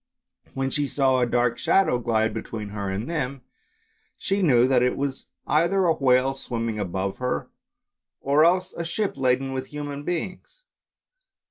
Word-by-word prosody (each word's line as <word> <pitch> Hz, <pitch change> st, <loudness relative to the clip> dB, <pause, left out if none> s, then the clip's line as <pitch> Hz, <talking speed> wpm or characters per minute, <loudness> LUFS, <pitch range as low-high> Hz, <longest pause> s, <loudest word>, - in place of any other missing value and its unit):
When 135 Hz, 0 st, -1 dB
she 145 Hz, -1 st, +1 dB
saw 135 Hz, -2 st, +2 dB
a 125 Hz, -, +2 dB
dark 120 Hz, 0 st, +1 dB
shadow 170 Hz, -6 st, +3 dB
glide 110 Hz, -2 st, +1 dB
between 110 Hz, -1 st, -5 dB
her 100 Hz, -1 st, -4 dB
and 100 Hz, +5 st, -3 dB
them, 140 Hz, -5 st, -3 dB, 0.7 s
she 195 Hz, +1 st, -1 dB
knew 125 Hz, -8 st, +4 dB
that 130 Hz, -2 st, +3 dB
it 125 Hz, 0 st, +1 dB
was 135 Hz, -1 st, -3 dB, 0.2 s
either 170 Hz, +5 st, +2 dB
a 165 Hz, -, +4 dB
whale 130 Hz, -2 st, +3 dB
swimming 115 Hz, -4 st, -4 dB
above 95 Hz, 0 st, -3 dB
her, 125 Hz, -, -2 dB, 0.7 s
or 140 Hz, +3 st, +3 dB
else 185 Hz, +2 st, +2 dB
a 170 Hz, -, -4 dB
ship 195 Hz, +5 st, -1 dB
laden 135 Hz, 0 st, +1 dB
with 130 Hz, 0 st, -4 dB
human 145 Hz, -1 st, -6 dB
beings. 180 Hz, -, -5 dB
135 Hz, 155 wpm, -25 LUFS, 120-155 Hz, 0.7 s, knew